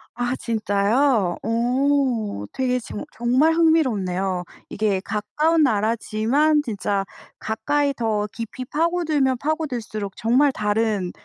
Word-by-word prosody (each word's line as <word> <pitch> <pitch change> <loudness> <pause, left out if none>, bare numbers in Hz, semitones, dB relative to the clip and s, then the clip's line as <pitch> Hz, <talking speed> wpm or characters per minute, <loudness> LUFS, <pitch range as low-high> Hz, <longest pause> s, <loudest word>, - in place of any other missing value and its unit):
아 245 +1 -1
진짜요? 215 -1 +1
어 240 - 0
되게 250 -1 0
지금 225 -1 -7
정말 250 +8 +2
흥미롭네요. 200 - +1 0.3
이게 205 -2 0
가까운 300 +11 +1
나라지만 230 +6 +2
진짜 200 -5 -2 0.3
가까이 285 +6 0
더 220 -4 -1
깊이 230 +2 -6
파고들면 310 -3 +1
파고들수록 240 - -3
정말 255 +6 +3
다른 210 -4 0
235 Hz, 245 characters per minute, -22 LUFS, 210-285 Hz, 0.3 s, 정말